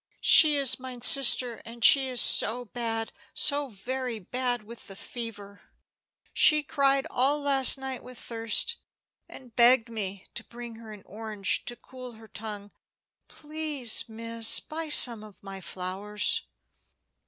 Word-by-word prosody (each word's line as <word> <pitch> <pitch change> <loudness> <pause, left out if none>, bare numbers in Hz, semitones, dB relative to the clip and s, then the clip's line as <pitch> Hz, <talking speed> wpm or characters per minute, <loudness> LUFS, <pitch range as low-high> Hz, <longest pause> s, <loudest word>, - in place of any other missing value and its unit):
"She 305 -2 +6
is 270 -3 0
mine 255 -1 -10
sister, 250 -2 +4
and 230 0 -3
she 270 -2 +5
is 250 -1 -2
so 245 +4 +3
bad, 225 -1 -5 0.2
so 285 -1 +2
very 250 +2 -6
bad, 245 +3 -4
with 230 +2 -14
the 195 - -12
fever. 205 -3 -9 0.7
She 305 -1 +4
cried 275 -1 0
all 275 +4 +1
last 275 -2 +4
night 265 -1 -6
with 250 -1 -13
thirst, 230 - -3 0.5
and 245 -4 -15
begged 240 -1 +4
me 200 -4 -7
to 235 - -7
bring 235 -1 -11
her 225 -1 -13
an 210 -2 -13
orange 210 -1 -2
to 240 - -4
cool 250 0 -13
her 220 0 -17
tongue. 205 -1 -8 0.6
Please, 300 -6 -3
miss, 230 0 0
buy 320 0 -7
some 235 -7 +5
of 210 -2 -17
my 195 -1 -10
flowers." 190 +4 -3
235 Hz, 140 wpm, -26 LUFS, 220-265 Hz, 0.7 s, She